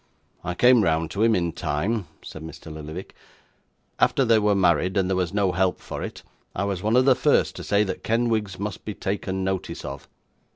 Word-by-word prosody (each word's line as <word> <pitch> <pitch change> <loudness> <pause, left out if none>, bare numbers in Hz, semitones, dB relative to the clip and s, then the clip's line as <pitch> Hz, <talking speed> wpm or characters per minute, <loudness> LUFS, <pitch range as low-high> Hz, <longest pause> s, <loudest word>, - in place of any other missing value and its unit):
'I 90 - -3
came 125 +2 +5
round 80 -1 +1
to 100 - -3
him 115 0 +4
in 85 -2 0
time,' 95 +8 -2 0.2
said 80 - -9
Mr. 80 0 -9
Lillyvick. 80 +4 -8 0.9
'After 135 - +3
they 115 -2 +5
were 105 -1 +2
married, 90 0 +2
and 95 -1 +2
there 95 - 0
was 90 -2 0
no 100 -2 +1
help 95 0 +1
for - - -7
it, - - -6 0.3
I - - -1
was 100 -3 -2
one 110 +3 +1
of 130 +1 +5
the 135 - +7
first - - +2
to - - -6
say 100 +1 +2
that 95 -3 -4
Kenwigs 110 -4 0
must 100 0 -5
be 105 - -5
taken 95 -1 -3
notice 95 -1 -3
of. - - -7
95 Hz, 205 wpm, -24 LUFS, 90-105 Hz, 0.9 s, the